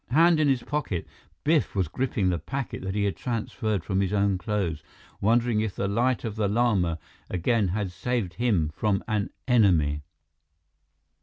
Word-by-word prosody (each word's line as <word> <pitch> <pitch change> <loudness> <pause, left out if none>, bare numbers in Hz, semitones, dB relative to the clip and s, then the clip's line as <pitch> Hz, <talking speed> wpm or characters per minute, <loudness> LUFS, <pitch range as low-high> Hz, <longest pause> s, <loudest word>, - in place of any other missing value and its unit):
Hand 165 +4 +5
in 155 - +3
his 130 -3 +2
pocket, 145 - -2 0.4
Biff 155 -5 +2
was 95 -4 +1
gripping 110 - 0
the 85 -2 0
packet 120 - -4
that 95 +1 -4
he 105 - +1
had 100 -1 0
transferred 110 -4 -2
from 95 0 0
his 95 -1 0
own 100 -2 +2
clothes, 90 -7 -2 0.4
wondering 115 +1 +3
if 110 -3 -2
the 100 - -1
Light 120 +5 +1
of 110 -3 -3
the 110 -2 +1
Lama 100 -7 +2 0.3
again 100 +4 +1
had 95 +1 -2
saved 95 0 -2
him 95 -6 +1
from 100 +4 0
an 105 -3 0 0.2
enemy! 85 - +3
105 Hz, 165 wpm, -26 LUFS, 95-120 Hz, 0.4 s, Hand